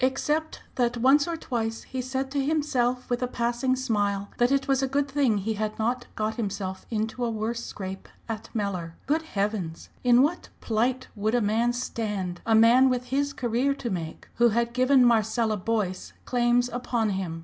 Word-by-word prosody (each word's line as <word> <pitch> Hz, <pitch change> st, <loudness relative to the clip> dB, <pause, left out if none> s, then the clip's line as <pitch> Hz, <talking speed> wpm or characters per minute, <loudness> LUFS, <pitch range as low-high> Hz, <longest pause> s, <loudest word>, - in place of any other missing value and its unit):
Except 300 Hz, +4 st, 0 dB
that 245 Hz, -1 st, +1 dB
once 270 Hz, +5 st, +4 dB
or 335 Hz, -1 st, -2 dB
twice 225 Hz, -6 st, -3 dB
he 260 Hz, -, -4 dB
said 265 Hz, +1 st, -3 dB
to 280 Hz, -1 st, 0 dB
himself 255 Hz, -5 st, 0 dB
with 245 Hz, 0 st, -1 dB
a 250 Hz, -, +1 dB
passing 240 Hz, +2 st, 0 dB
smile 205 Hz, -6 st, -1 dB
that 240 Hz, +2 st, +3 dB
it 275 Hz, -1 st, +1 dB
was 270 Hz, -1 st, +2 dB
a 270 Hz, -, +1 dB
good 280 Hz, +2 st, 0 dB
thing 270 Hz, -6 st, +2 dB
he 210 Hz, +3 st, -1 dB
had 215 Hz, 0 st, -3 dB
not 245 Hz, +3 st, -1 dB
got 215 Hz, +2 st, -2 dB
himself 195 Hz, -4 st, -4 dB
into 225 Hz, +2 st, -2 dB
a 235 Hz, -, +1 dB
worse 230 Hz, +2 st, -3 dB
scrape 190 Hz, -1 st, -7 dB, 0.2 s
at 220 Hz, -2 st, -5 dB
Mellor. 185 Hz, -6 st, -2 dB
Good 310 Hz, +3 st, +1 dB
heavens! 200 Hz, -, -3 dB
in 245 Hz, 0 st, +6 dB
what 320 Hz, +5 st, -1 dB
plight 245 Hz, +4 st, 0 dB
would 215 Hz, +2 st, 0 dB
a -, -, +4 dB
man 225 Hz, +2 st, +2 dB
stand 210 Hz, -7 st, -3 dB
a 225 Hz, -, +4 dB
man 240 Hz, +4 st, +6 dB
with 250 Hz, -1 st, -1 dB
his 280 Hz, +1 st, +1 dB
career 250 Hz, +2 st, 0 dB
to 240 Hz, -4 st, -4 dB
make 165 Hz, -3 st, -5 dB
who 240 Hz, 0 st, +5 dB
had 235 Hz, +1 st, 0 dB
given 255 Hz, +1 st, +5 dB
Marcella 225 Hz, -1 st, +2 dB
Boyce 200 Hz, -2 st, -2 dB
claims 245 Hz, 0 st, +2 dB
upon 240 Hz, -3 st, -1 dB
him! 185 Hz, -4 st, -3 dB
235 Hz, 185 wpm, -26 LUFS, 215-260 Hz, 0.2 s, in